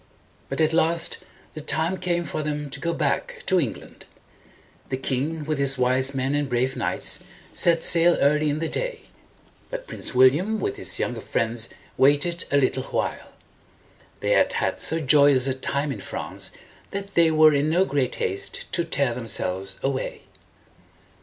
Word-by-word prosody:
But - - -2
at 155 0 +3
last 165 +1 +1 0.3
the 155 - -6
time 160 +5 0
came 175 -1 -1
for 155 - -3
them 150 -1 -4
to 140 - -5
go 170 +3 -1
back 150 -4 -2
to 185 - +3
England. 135 -9 -5 0.8
The 130 - -2
king, 145 +4 -2
with 155 -1 -2
his 135 -1 +2
wise 130 +2 +1
men 135 +1 0
and 145 -1 0
brave 125 +2 0
knights, - - 0 0.3
set 170 -1 +2
sail 170 0 +5
early 150 +2 +3
in 145 - -1
the 165 +1 -1
day; - - -3 0.7
but - - -5
Prince 140 - -5
William 150 +13 +4
with 405 0 -2
his 390 - -1
younger - - -2
friends 115 0 -1 0.3
waited 145 +6 +3
a 140 - +2
little 130 -1 +1
while. - - -3 0.9
They - - 0
had - - +3
had - - -1
so 165 - 0
joyous 140 -3 +5
a 135 - +1
time 140 +2 -2
in - - -6
France - - -4 0.4
that 200 0 -6
they 170 -1 +5
were 155 -1 +6
in 145 +2 +1
no 180 +4 +3
great 135 -7 -1
haste 95 +1 -3
to 170 - 0
tear 140 -6 +1
them 120 -1 -6
selves 95 -1 -2
away. 135 -1 -3
145 Hz, 170 wpm, -24 LUFS, 130-165 Hz, 0.9 s, were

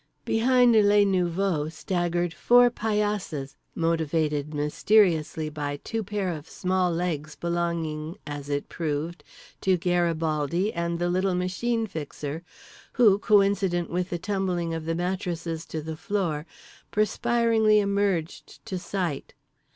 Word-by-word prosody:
Behind 245 +1 +4
les 205 -1 +5
nouveaux 180 -4 0
staggered 175 0 -1
four 245 +4 +5
paillasses 210 - -2 0.2
motivated 160 -3 0
mysteriously 160 +1 +2
by 145 -1 -4
two 225 -1 -3
pair 200 -1 -2
of 155 -3 -7
small 185 -1 0
legs 160 -4 -2
belonging 170 -1 -2
(as 145 -1 -6
it 145 0 -2
proved) 160 +1 -3 0.4
to 190 -1 +3
Garibaldi 170 +1 0
and 170 0 -2
the 175 +1 0
little 185 +1 +1
Machine 225 +6 -1
Fixer; 150 -3 -6 0.5
who, 215 -6 +5
coincident 195 -4 +2
with 180 +1 -1
the 175 - -2
tumbling 180 -3 -1
of 165 -1 -4
the 165 0 -1
mattresses 175 -2 -3
to 155 -1 -5
the 160 0 -5
floor, 170 -3 -2 0.4
perspiringly 220 0 +3
emerged 200 -5 -1
to 185 - -4
sight. 175 -7 -3
175 Hz, 120 wpm, -26 LUFS, 160-200 Hz, 0.5 s, les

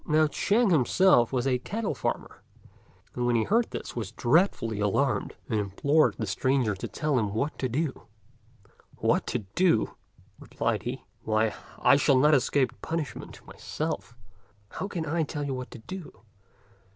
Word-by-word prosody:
Now 155 +1 +4
Ch'ên 205 +8 +2
himself 155 -3 +4
was 125 -2 0
a 130 -2 +1
cattle 215 - -3
farmer, - - -4 0.7
and 125 0 -1
when 120 - +2
he 115 - +3
heard 230 - +2
this - - -6
was 110 -4 -4
dreadfully 120 - +1
alarmed, 115 +7 0
and 110 -3 0
implored 140 +10 +2
the 110 - -2
stranger 120 +3 +1
to 95 - -5
tell 150 -4 0
him 105 -2 -2
what 140 +7 -1
to 130 - -1
do. 140 +3 -3 0.9
"What - - +1
to 115 -5 -2
do!" 175 -12 +2 0.5
replied - - -2
he; - - -5 0.2
"why, 110 0 +1 0.2
I 140 - +5
shall 140 -2 +4
not 150 +4 +5
escape 130 -2 +1
punishment 160 -7 -5
myself; 115 - -5 0.5
how 190 - -5
can 170 -5 -4
I 160 +2 0
tell 150 -1 -3
you 140 -1 -2
what 130 -1 -5
to - - -10
do. 150 - -9
135 Hz, 160 wpm, -27 LUFS, 115-155 Hz, 0.9 s, I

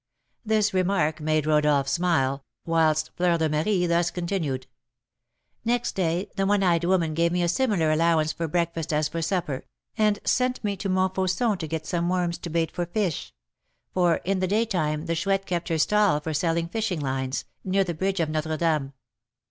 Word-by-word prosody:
'" - - -47
This 215 -2 +1
remark 180 -5 +1
made 155 0 +1
Rodolph 150 -2 +3
smile, 140 -3 +1 0.2
whilst 155 -2 +2
Fleur 175 -1 +2
de 160 -1 +1
Marie 175 +5 +1
thus 170 0 +2
continued: 170 -8 -2 1.0
"Next 240 +1 0
day 180 +2 -1
the 195 -1 0
one 205 -1 +2
eyed 170 -2 +2
woman 175 -3 +2
gave 170 +2 +2
me 175 0 +1
a - - +2
similar 175 -5 +1
allowance 160 0 +2
for 165 - -3
breakfast 165 0 -1
as 150 0 +1
for 165 +2 -4
supper, 165 -6 -2 0.4
and 210 -1 +3
sent 250 -1 +1
me 205 -1 -1
to 195 +1 -4
Montfauçon 190 +3 +1
to 160 - -4
get 160 0 -4
some 170 +1 -1
worms 175 -2 0
to 175 - -6
bait 165 -1 0
for 175 -1 -3
fish; 180 -3 -2 0.6
for 175 -2 +3
in 195 +1 0
the 185 - 0
daytime 175 -8 0
the 165 - -1
Chouette 195 +3 0
kept 175 -1 -2
her 165 - +1
stall 205 -1 +3
for 155 +1 -4
selling 165 +2 0
fishing 200 -2 -2
lines, 130 -1 -2 0.2
near 195 +1 +2
the 175 -2 -3
bridge 190 +4 -1
of 165 - +1
Notre 155 +1 -2
Dame. 155 -4 0
170 Hz, 185 wpm, -25 LUFS, 155-190 Hz, 1.0 s, Rodolph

